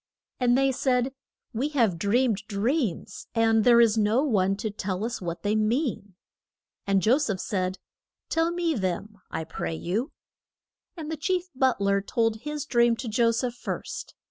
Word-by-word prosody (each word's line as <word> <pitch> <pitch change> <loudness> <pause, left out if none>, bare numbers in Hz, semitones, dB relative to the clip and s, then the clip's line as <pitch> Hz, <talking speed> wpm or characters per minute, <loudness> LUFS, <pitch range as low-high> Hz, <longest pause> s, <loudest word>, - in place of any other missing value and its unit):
And 245 0 +3
they 270 0 +3
said, 255 0 0 0.4
We 255 +6 -1
have 210 -9 +2
dreamed 215 +1 +1
dreams, 220 - -2
and 225 -1 +3
there 235 0 +6
is 225 -2 +4
no 215 +6 +3
one 195 -8 +2
to 215 +1 -4
tell 195 0 -3
us 235 -2 -4
what 170 -1 -5
they 210 +1 +1
mean. 215 - -1 0.7
And 195 -2 +2
Jo 250 +6 +4
seph 225 -10 -1
said, 185 -1 -2 0.5
Tell 325 +1 +1
me 345 -1 0
them, 205 - -3
I 160 - -3
pray 160 0 -4
you. 210 - -2 0.9
And 315 -1 -5
the 320 - -3
chief 360 +3 -1
but 260 -3 +2
ler 200 0 +2
told 225 +1 0
his 300 +5 -5
dream 235 -3 +3
to 235 +2 -6
Jo 230 +1 +3
seph 235 +1 -1
first. 245 - -6
230 Hz, 170 wpm, -26 LUFS, 200-260 Hz, 0.9 s, there